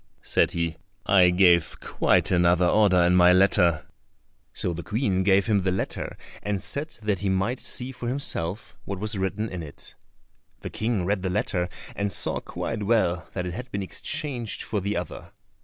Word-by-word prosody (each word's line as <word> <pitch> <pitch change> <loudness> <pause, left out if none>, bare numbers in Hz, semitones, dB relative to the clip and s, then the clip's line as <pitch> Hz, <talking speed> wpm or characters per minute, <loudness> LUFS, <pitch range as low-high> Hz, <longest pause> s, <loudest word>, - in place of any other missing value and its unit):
said - - +2
he; 85 -1 -2 0.3
"I 90 -2 +5
gave 90 -2 +3
quite - - +1
another 90 0 +4
order 95 0 +4
in 90 +1 +3
my 90 0 +7
letter." 90 -4 +3 0.7
So 90 - -2
the 85 - -5
Queen 105 -2 0
gave 95 +1 +3
him 105 -3 +2
the 95 0 0
letter, 95 - -3 0.2
and 105 -1 -2
said 140 +10 -2
that 105 -3 0
he 100 - -1
might 95 +7 0
see 125 +1 -2
for 125 -2 -7
himself 110 -7 -2
what 100 - -5
was 105 +3 -3
written 95 +3 -2
in 90 -4 -6
it. 75 -3 -9 0.7
The - - -6
King 110 -5 -1
read 100 0 0
the 95 - -2
letter 90 0 -1 0.3
and 100 0 -1
saw - - 0
quite 115 -2 -5
well 100 -5 +1
that 90 -2 -3
it 90 - -4
had 125 +5 -7
been 100 -1 -2
exchanged 120 +3 -3
for 105 -3 -2
the 100 +1 -2
other. 90 - -7
95 Hz, 180 wpm, -25 LUFS, 90-105 Hz, 0.7 s, my